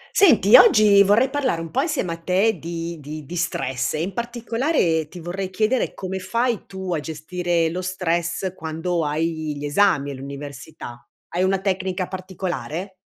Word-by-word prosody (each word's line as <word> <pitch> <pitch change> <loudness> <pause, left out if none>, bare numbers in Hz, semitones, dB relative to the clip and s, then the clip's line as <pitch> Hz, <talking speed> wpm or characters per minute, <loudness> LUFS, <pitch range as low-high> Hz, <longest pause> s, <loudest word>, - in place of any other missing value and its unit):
Senti, 240 - +6
oggi 210 -2 +7
vorrei 205 +6 +4
parlare 265 -12 0
un 165 -1 -6
po' 265 - +1
insieme 295 - -1
a - - -7
te 185 +4 +1
di 170 +1 -5
di 150 +1 -8
di 175 - -7
stress 135 -6 -1
e, 155 - -1
in 190 +3 -4
particolare, 235 - 0
ti 175 - -11
vorrei 180 +3 -4
chiedere 220 +6 0
come 190 0 -4
fai 230 +4 -1
tu 190 -2 -4
a 160 - 0
gestire 165 +3 -1
lo 180 - -3
stress 180 0 -1
quando 165 0 -2
hai 155 0 -2
gli 145 - -5
esami 145 -3 +2
all'università? 140 -2 -8 0.3
Hai 175 - -2
una 190 +1 +2
tecnica 185 -1 -1
particolare? 185 -1 -5
180 Hz, 160 wpm, -22 LUFS, 160-195 Hz, 0.3 s, oggi